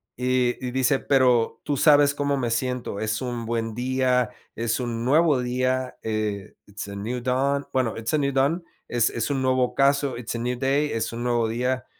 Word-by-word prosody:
y 125 0 +1
y 125 - -2
dice: 130 +1 +2
"Pero 125 -4 +2
tú 145 -1 -1
sabes 145 0 +5
cómo 145 -1 0
me 120 -3 -1
siento, 125 -3 -2
es 110 0 -1
un 120 -3 -4
buen 115 -1 -2
día, 125 -1 +1 0.3
es 115 +1 -1
un 120 -2 -3
nuevo 150 0 +3
día", 130 +1 -1
eh, 105 -3 -3
it's 100 0 -7
a 100 - -7
new 115 +5 -3
dawn, 135 +3 0
bueno, 130 -4 0
it's 115 +3 -3
a 155 - +3
new 140 -1 +1
dawn, 140 +6 +1 0.2
es 120 -2 +2
es 115 +4 -2
un 135 -2 0
nuevo 130 -1 +2
ocaso, 140 +1 +2
it's 120 -1 -5
a - - -2
new 120 +1 -2
day, 140 +3 +1
es 115 - -2
un 115 +1 -5
nuevo 120 -2 +1
día, 125 +2 -1
125 Hz, 200 wpm, -24 LUFS, 115-135 Hz, 0.3 s, sabes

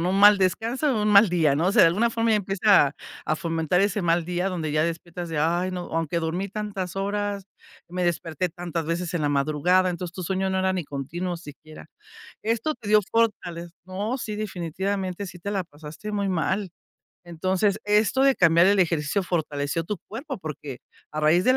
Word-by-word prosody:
¿no?, 175 +2 0
un 195 - +1
mal 205 0 +8
descanso, 230 +9 0
un 210 - +1
mal 205 +1 +7
día, 160 -5 +2
no 170 +6 +2
sé, - - +4
de - - +8
alguna 215 +8 +2
forma 230 -1 +1
empieza 195 -6 +3 0.3
a 155 - 0
fomentar 165 +2 0
ese 200 0 +1
mal 170 -1 +2
día 180 +2 -1
donde 160 -5 -3
ya 155 0 +2
despiertas 170 +1 -4
de: 160 -2 -3
"Ay, 170 +4 +1
no, 180 -1 -4
aunque 165 +1 -1
dormí 170 +5 -2
tantas 195 -3 -5
horas, 200 0 -2 0.4
me 180 +1 -3
desperté 170 0 -1
tantas 170 -1 -4
veces 170 +1 -2
en 165 - 0
la 145 - +1
madrugada". 155 +6 +2
Entonces 175 -1 -4
tu 185 -1 -6
sueño 190 +1 -1
no 190 - 0
era 190 0 +1
ni 185 -3 -2
continuo 170 +6 -4
siquiera. 155 -1 -12 0.6
Esto 230 +7 0
te 230 -4 -11
dio 210 0 +6
fortaleza 175 -7 -1
No, 200 +6 -3
sí, 215 -3 -4
definitivamente 190 0 -3
sí 180 -1 -10
te 200 +4 -5
la 195 -2 -1
pasaste 160 +5 -9
muy 200 -1 -1
mal. 190 +3 -1 0.6
Entonces, 185 +4 0
esto 210 +5 +3
de 275 0 +5
cambiar 170 -2 +5
el 200 +1 +4
ejercicio 165 0 +1
fortaleció 155 -3 -2
tu 205 +6 -4
cuerpo 265 +6 -6
porque 150 -6 -7 0.3
a 155 - -3
raíz 155 +4 +4
del 255 +1 +4
180 Hz, 190 wpm, -25 LUFS, 165-200 Hz, 0.6 s, mal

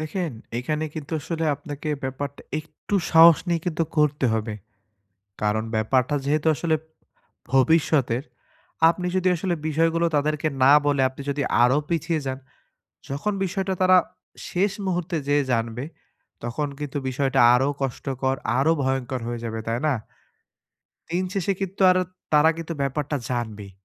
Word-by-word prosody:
দেখেন 160 +2 -3 0.3
এখানে 150 +5 -2
কিন্তু 155 -1 -7
আসলে 165 +2 -3
আপনাকে 145 +1 -7 0.2
ব্যাপারটা 140 +2 -5 0.2
একটু 155 +5 -7 0.2
সাহস 165 0 +8
নিয়ে 170 -1 +1
কিন্তু 165 -1 0 0.2
করতে 150 -2 +2
হবে। 110 -1 -2 0.9
কারন 105 +1 +1
ব্যাপারটা 125 +6 +1
যেহেতু 150 +2 0
আসলে 160 +1 0 0.8
ভবিষ্যতের। 135 -2 +3 0.7
আপনি 180 +1 -3
যদি 185 0 +2
আসলে 175 +1 -1
বিষয় 165 +2 +2
গুলো 170 0 +2
তাদেরকে 150 +1 0 0.2
না 140 - +7
বলে 140 -2 +2
আপনি 130 +2 -10
যদি 140 0 -1 0.2
আরো 125 +3 +4
পিছিয়ে 165 -1 0
যান। 130 0 -3 0.7
যখন 145 +10 -2
বিষয়টা 190 +1 -2
তারা 185 0 +6 0.5
শেষ 190 +3 +1
মুহুর্তে 175 -2 -1
যেয়ে 145 0 +3
জানবে, 115 +2 -1 0.6
তখন 135 +5 -2
কিন্তু 145 -1 -4
বিষয়টা 135 +1 0 0.2
আরো 135 +2 +2
কষ্টকর, 135 0 -2 0.2
আরো 155 +4 +3
ভয়ঙ্কর 130 -1 -1
হয়ে 120 0 -3
যাবে। 115 -1 -4
তাই 115 +1 0
না? 145 - +2 1.2
দিন 180 +2 0
শেষে 195 0 0
কিন্তু 195 0 -4
আর, 185 - +3 0.4
তারা 150 +2 +6
কিন্তু 165 0 -5
ব্যাপারটা 145 +2 -1
জানবেই। 110 -5 -4
145 Hz, 140 wpm, -24 LUFS, 130-165 Hz, 1.2 s, সাহস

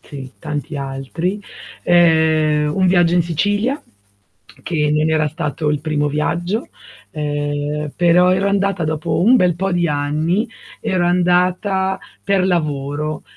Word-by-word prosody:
Sì, 135 -2 -9
tanti 150 -1 -5
altri. 140 +8 -3 0.4
Ehm, 160 -3 +3
un 190 +2 +2
viaggio 175 -1 +3
in 175 - +4
Sicilia, 205 - -1 0.8
che 150 -3 0
non 155 +1 +2
era 155 -1 +2
stato 155 -1 -2
il 150 - -1
primo 150 -1 -1
viaggio, 175 - -2 0.4
ehm, 145 0 -3
però 175 +1 +4
ero 195 +1 +1
andata 195 -4 0
dopo 155 +1 -1
un 240 +7 +6
bel 180 -7 +3
po' 195 +2 -2
di 175 -1 +1
anni, 155 - 0 0.3
ero 180 -2 0
andata 180 +2 +1 0.2
per 195 -2 +1
lavoro 150 -3 -2
165 Hz, 130 wpm, -18 LUFS, 150-180 Hz, 0.8 s, un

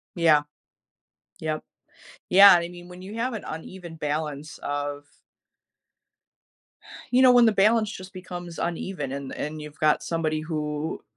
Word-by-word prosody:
Yeah. 160 -4 +4 1.0
Yep. 155 -1 -3 0.7
Yeah, 195 +2 +9
I 170 -1 +1
mean, 175 0 -12
when 180 0 -11
you 195 +3 -9
have 240 +3 -2
an 220 - -6
uneven 170 +2 -8
balance 150 0 -4
of 145 0 -4 2.1
you 255 +1 +5
know, 255 - +8
when 245 -1 +6
the 220 - +4
balance 215 +2 +3
just 185 -2 -9
becomes 175 -2 -8
uneven 170 -4 -3
and 140 -1 -6
and 155 +1 -5
you've 150 -1 -11
got 155 -1 +3
somebody 160 -2 -1
who, 155 -1 -4
165 Hz, 140 wpm, -25 LUFS, 150-190 Hz, 2.1 s, Yeah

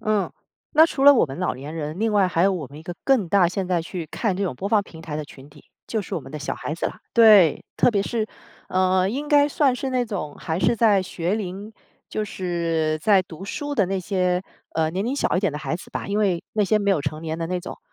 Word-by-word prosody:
嗯。 215 -2 0 0.5
那 315 - +9
除 275 -4 -1
了 285 - +10
我 240 - +4
们 135 -1 -7
老 180 - -1
年 140 +4 -8
人， 155 +2 -5
另 225 -1 +1
外 200 -2 +4
还 170 -1 +1
有 195 - +4
我 165 -7 -4
们 145 +3 -12
一 - - -13
个 175 +1 -6
更 250 -10 +2
大 190 -2 +4
现 185 +1 -3
在 175 -2 +1
去 170 0 -6
看 200 -6 -1
这 200 - -2
种 175 -10 -2
播 200 - -3
放 210 -2 +3
平 160 -4 -13
台 160 -2 -7
的 150 0 -3
群 140 -1 -14
体， 145 0 -18 0.2
就 220 -2 -2
是 180 - -5
我 - - -3
们 135 +2 -12
的 - - -5
小 145 - -3
孩 155 - -4
子 - - -2
啦。 - - -7
对， 210 -9 +6
特 245 - +4
别 200 - +2
是， 220 +1 -2 0.4
呃， 185 0 +2
应 285 +7 -3
该 290 0 +5
算 275 -3 +2
是 265 +1 -3
那 250 -1 +1
种 185 -10 -5
还 160 +2 -3
是 235 - +3
在 215 -4 +4
学 185 +1 -2
龄， 200 +2 -6 0.4
就 215 - -2
是 165 -5 -1
在 195 +1 +4
读 175 +1 -10
书 290 +7 -4
的 205 -9 +2
那 195 0 -2
些， 180 -1 0 0.3
呃， 160 0 +1
年 190 +4 -2
龄 255 - -1
小 280 - 0
一 - - +1
点 195 -6 0
的 150 - -4
孩 160 - -2
子 175 - -13
吧， - - -5
因 205 +1 0
为 185 -5 +1
那 210 - +2
些 205 +3 +2
没 200 0 +1
有 180 - +2
成 155 +2 -4
年 160 0 -4
的 165 - -2
那 180 0 -2
种。 - - -8
185 Hz, 290 characters per minute, -23 LUFS, 165-215 Hz, 0.5 s, 了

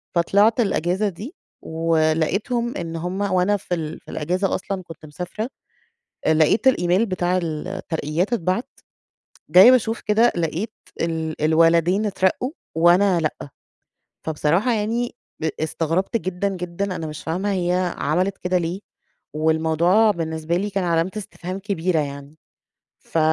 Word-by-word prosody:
فطلعت 205 +7 +3
الأجازة 195 -1 +1
دي 210 - -9 0.3
ولقيتهم 165 - 0
إن 165 -2 -5
هم 180 +4 -3
وأنا 195 +1 +2
في 180 - -5
ال 155 -2 -5
في - - -13
الأجازة 180 +5 -1
أصلًا 190 0 -4
كنت 165 -2 -12
مسافرة، 180 - -5 0.8
أ 160 - +4
لقيت 160 - +3
الإيميل 185 -1 +2
بتاع 185 -1 0
الترقيات 160 +3 -3
اتبعت، 185 +2 0 0.8
جاية 185 +9 +9
باشوف 230 -2 +2
كده 225 +3 +3
لقيت 175 +6 -2 0.3
ال 160 -2 -2
الولدين 165 +5 +3
اترقّوا 200 +6 0 0.2
وأنا 175 +3 +4
لأ. 155 -3 -3 0.7
فبصراحة 165 +9 +1
يعني 230 +3 -1 0.2
ب 160 - 0
استغربت 165 +7 0
جدًا، 185 0 -2
جدًا، 180 +1 -3
أنا 160 - -4
مش 150 0 -8
فاهمة 185 +5 -1
هي 180 -1 0
عملت 185 +6 0
كده 180 0 0
ليه؟ 175 +2 -2 0.5
والموضوع 160 +7 +3
بالنسبة 160 -1 -2
لي 205 +2 -2
كان 195 -2 -1
علامة 170 +1 +1
استفهام 190 -2 -6
كبيرة 185 -4 0
يعني. 140 +1 -5 0.6
ف 165 - -4
180 Hz, 130 wpm, -22 LUFS, 160-200 Hz, 0.8 s, جاية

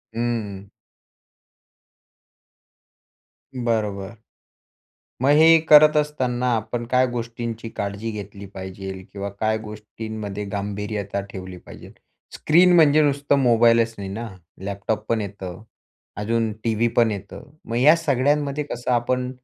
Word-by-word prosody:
हं. 105 -5 -3 2.9
बरोबर. 110 -4 -2 1.1
मग 135 - +4
हे 165 +1 +7
करत 150 0 +8
असताना 130 -5 0
आपण 115 +2 -4
काय 130 0 +4
गोष्टींची 115 -1 -5
काळजी 100 +2 -3
घेतली 100 -1 -8
पाहिजे 95 +1 -6 0.2
किंवा 100 0 -5
काय 110 0 +1
गोष्टींमध्ये 105 -1 -7
गांभीर्यता 100 0 -3
ठेवली 95 -1 -8
पाहिजे? - - -13 0.4
स्क्रीन 175 +4 +4
म्हणजे 155 -2 +6
नुसतं 145 -1 +2
मोबाईलच 115 -1 +4
नाही 100 -1 -5
ना, 115 +3 -5 0.4
लॅपटॉप 100 +2 -3
पण 115 -1 +1
येतं, 95 -3 -7 0.5
अजून 110 +1 -1
टीव्ही 115 +1 +1
पण 115 -2 +4
येतं. 100 +7 -8
मग 115 - -4
या 145 +7 +6
सगळ्यांमध्ये 145 0 0
कसं 120 +1 -4
आपण 125 +1 0
115 Hz, 110 wpm, -22 LUFS, 100-125 Hz, 2.9 s, करत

